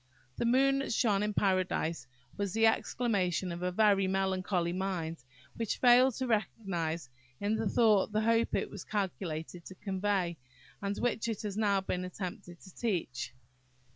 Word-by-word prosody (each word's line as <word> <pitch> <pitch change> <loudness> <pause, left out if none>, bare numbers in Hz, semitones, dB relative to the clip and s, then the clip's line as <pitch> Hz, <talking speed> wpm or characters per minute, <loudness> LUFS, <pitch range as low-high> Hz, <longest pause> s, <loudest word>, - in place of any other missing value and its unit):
"The - - 0
moon 270 +3 +4
that 275 - -3
shone 210 -3 +2
in 210 0 -1
Paradise," 180 -7 0 0.3
was 200 -2 -2
the 225 0 +4
ex 225 - +2
clamation 190 -7 0
of 170 - -6
a 180 0 0
very 200 -1 +4
melancholy 190 -2 0
mind, 175 -6 -3 0.3
which 230 -3 -1
failed 250 0 +6
to 260 - -2
recognise 180 - -1 0.3
in 205 +2 0
the 220 -2 0
thought 215 -3 +4
the 215 0 +1
hope 230 +1 +2
it - - -1
was 200 - -7
calculated 180 -5 -3
to 190 - -10
convey, 190 -3 -1 0.4
and 200 0 -2
which 240 -2 0
it 225 -2 -3
has 205 -2 -3
now 205 -2 +2
been 180 -1 -2
attempted 180 -1 -6
to 190 - -14
teach. 170 - -2
195 Hz, 165 wpm, -31 LUFS, 180-220 Hz, 0.4 s, failed